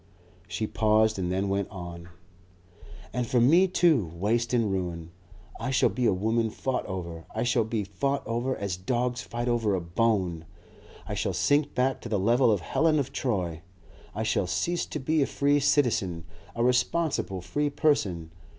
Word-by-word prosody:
She 110 - -2
paused 110 -1 +2
and 90 -1 -1
then 95 +2 0
went 100 0 -1
on: 85 -3 -8 1.0
"And 125 -1 -1
for 125 - +2
me 165 +11 +5
too, 155 - +2
waste 115 +6 0
and 115 -5 +1
ruin. 85 -3 -3 0.5
I - - -3
shall 130 -1 +3
be 125 -2 0
a - - +4
woman 110 +4 0
fought 130 +4 -3
over. 85 -3 -6
I - - 0
shall 120 -2 +2
be 110 -1 -2
fought 135 +9 -2
over 120 +4 -1
as 100 -3 -3
dogs 125 +5 -1
fight 120 +1 -4
over 115 -4 +1
a - - 0
bone. 90 -2 0 0.6
I - - -4
shall - - -1
sink 145 0 +1
back 130 +2 +1
to - - -7
the 105 - +1
level 120 +5 +3
of 100 -4 +1
Helen 155 - +2
of 135 -1 -2
Troy. 90 - -2 0.5
I - - -1
shall - - 0
cease 175 0 -1
to - - -4
be 155 +4 +1
a 135 - +2
free 145 +1 +2
citizen, 110 - +1 0.3
a 115 - 0
responsible 125 - +1
free 145 +12 -1
person. 100 - 0
115 Hz, 175 wpm, -27 LUFS, 95-130 Hz, 1.0 s, me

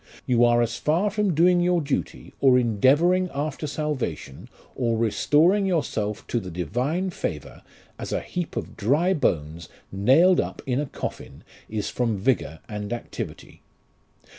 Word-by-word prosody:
You 120 -1 +3
are 120 0 +4
as 120 +1 -3
far 175 +7 +1
from 205 -4 0
doing 175 +2 +4
your 175 0 +2
duty, 145 -3 -4
or 130 -2 +5
endeavouring 145 - +3
after 150 +2 -3
salvation, 140 - -4 0.2
or 115 -3 0
restoring 155 - +3
yourself 110 - -2
to 120 - -1
the 95 -4 -7
Divine 125 - -2
favour, 75 - -5 0.4
as - - -6
a - - 0
heap 175 -2 -5
of - - -5
dry 145 - +2
bones 80 - -1 0.2
nailed 135 - +4
up - - -7
in 130 0 0
a 145 - -2
coffin - - -7 0.3
is 105 -2 -3
from 115 -4 -1
vigour 95 - -1
and 105 -2 -6
activity. 120 - -7
130 Hz, 145 wpm, -24 LUFS, 110-170 Hz, 0.4 s, or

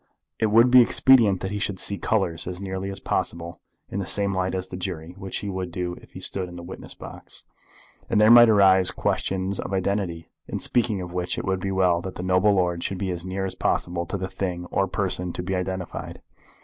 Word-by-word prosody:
It 110 - +2
would 115 +4 +5
be 125 0 +9
expedient 115 -6 +4
that 95 - -3
he 105 - -3
should 100 -1 -2
see 100 +2 +2
colours 90 -7 -1
as 90 0 -5
nearly 95 0 -4
as 100 - -6
possible 85 0 -3 0.3
in 100 - -4
the 95 - -4
same 100 0 +1
light 95 0 -1
as 95 0 -3
the 90 - -6
jury, 90 -3 -5
which 95 -1 -6
he 100 - -5
would 95 -2 -4
do 90 0 -3
if - - -19
he - - -8
stood 95 -2 -4
in 90 - -10
the 85 - -8
witness - - -9
box. - - -9 0.6
And 110 - +2
there 105 +1 +6
might 120 -1 +9
arise 95 -3 +5
questions 95 +1 -1
of - - -4
identity, 95 -3 -2 0.2
in - - -3
speaking 110 -5 +1
of 90 0 -8
which 90 0 -2
it - - -3
would 95 0 0
be 95 - -3
well 90 -3 +2
that 95 +1 -7
the 90 - -5
noble 95 +3 +3
lord 90 -2 0
should 95 - -3
be 95 0 -2
as 90 +1 -5
near 95 +1 -2
as 95 - -4
possible 85 -1 -1
to 100 - -3
the 95 0 -3
thing 95 -2 -4
or 95 - +1
person 90 -3 -2
to 90 - -5
be 95 +2 -3
identified. 90 0 -4
95 Hz, 230 wpm, -24 LUFS, 90-100 Hz, 0.6 s, be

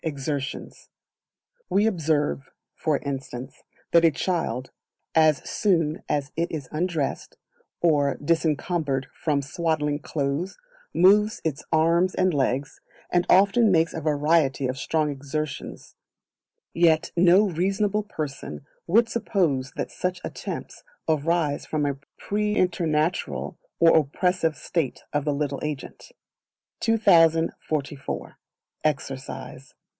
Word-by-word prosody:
Exertions. 140 -2 -4 0.8
We 205 +2 +3
observe, 155 -8 0 0.2
for 155 -3 0
instance, 135 -2 -6 0.3
that 170 0 +5
a 165 - +7
child, 155 -4 -2 0.4
as 155 -3 +3
soon 165 -4 +1
as 145 0 -1
it 170 +1 -1
is 145 -5 -5
undressed, 160 -3 -2 0.4
or 145 -4 +3
disencumbered 155 -2 0
from 145 -3 -1
swaddling 150 0 -1
clothes, 150 +3 -2 0.3
moves 210 +4 +4
its 150 -2 -2
arms 170 +3 +3
and 185 -1 +2
legs, 135 0 -1 0.3
and 175 0 +2
often 200 +3 +5
makes 165 -2 +3
a 160 - -4
variety 150 -2 +2
of 130 - -2
strong 155 0 0
exertions; 145 +2 -5 0.8
yet 165 -2 +3
no 180 +4 +5
reasonable 195 +5 0
person 150 -7 -6 0.2
would 225 +7 +4
suppose 170 - 0
that - - -4
such 180 -1 -2
attempts - - -6 0.2
arise 155 -1 0
from 150 -2 -1
a 140 -1 -1 0.2
preternatural 180 -6 0 0.2
or 165 -1 +6
oppressive 160 +2 +1
state 160 -4 -2
of 145 -1 0
the 145 - +1
little 140 -1 -2
agent. 150 -3 -6 0.7
2044. 165 -8 +1 0.4
Exercise. 140 -3 -4
160 Hz, 110 wpm, -25 LUFS, 145-175 Hz, 0.8 s, a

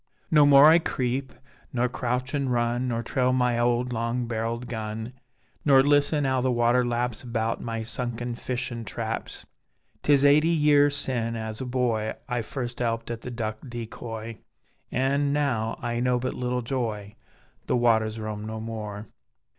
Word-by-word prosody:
No 150 -2 +6
more 140 0 +8
I 160 +2 +8
creep, 130 -3 -2 0.4
nor 125 -2 +1
crouchin', 130 +3 -2
run, 120 +1 0
Nor 115 -1 -1
trail 125 +2 +1
my 125 -2 +2
owd 120 +1 +1
long 115 +1 -1
barrelled 115 +1 -3
gun 110 0 -5 0.5
Nor 135 -2 +6
listen 145 +1 +3
'ow 130 -1 +1
the 130 0 +1
water 120 +1 +3
laps 120 -1 -1
About 115 -2 -2
my 115 -1 -3
sunken 120 +1 -4
fishin' 120 -1 -4
traps; 105 - -5 0.6
'Tis 145 -1 +4
eighty 150 +3 +6
year 150 -3 +4
sin, 125 -5 -2
as 110 +1 -4
a 130 - -4
boy, 120 -4 0
I 125 -3 -1
first 120 +1 -5
'elped 115 -1 -1
at 115 -1 -5
the 125 - -6
duck 110 -3 -4
decoy, 115 -1 -7 0.5
An' 140 +2 +1
now 125 -7 0
I 120 0 -1
know 125 0 +2
but 130 +1 -2
little 125 0 -2
joy: 110 -5 -3 0.5
The - - +2
waters 110 -2 +2
roam 105 -1 -4
no 110 0 -5
more. 110 -2 -6
120 Hz, 155 wpm, -26 LUFS, 115-130 Hz, 0.6 s, more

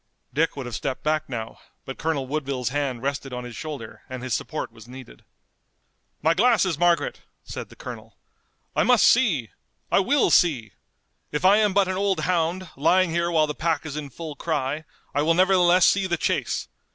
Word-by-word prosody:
Dick 160 +3 +1
would 135 - -4
have 120 - -7
stepped 130 +3 -3
back 155 -1 0
now, 115 -3 -6 0.3
but 135 - -7
Colonel 155 -4 -1
Woodville's 135 -3 -2
hand 135 -3 -2
rested 140 -1 -3
on 125 0 -4
his 120 -1 -8
shoulder 145 -8 -7
and 130 -1 -6
his 130 -2 -3
support - - -3
was 115 0 -15
needed. 125 - -12 1.0
"My 160 +2 +4
glasses, 195 -5 +2
Margaret!" 175 -1 +2 0.2
said - - -7
the - - -15
colonel. - - -9 0.6
"I - - +3
must 250 -3 +5
see! 170 - +3 0.4
I - - +5
will 270 +8 +2
see! 125 - +3 0.6
If 150 +4 -2
I 200 +2 +7
am 210 -2 +3
but 200 -2 +4
an 185 0 -2
old 195 -1 +1
hound, 180 +1 0
lying 180 +5 +3
here 170 +1 0
while 160 -2 +3
the 150 - -4
pack 160 0 -1
is 150 -2 -5
in 150 -2 -5
full 155 +2 -8
cry, 150 -1 -2 0.3
I 145 - +1
will 165 +2 +3
nevertheless 185 -1 +5
see 195 -1 +3
the 175 -1 0
chase! - - -1
155 Hz, 190 wpm, -24 LUFS, 135-180 Hz, 1.0 s, I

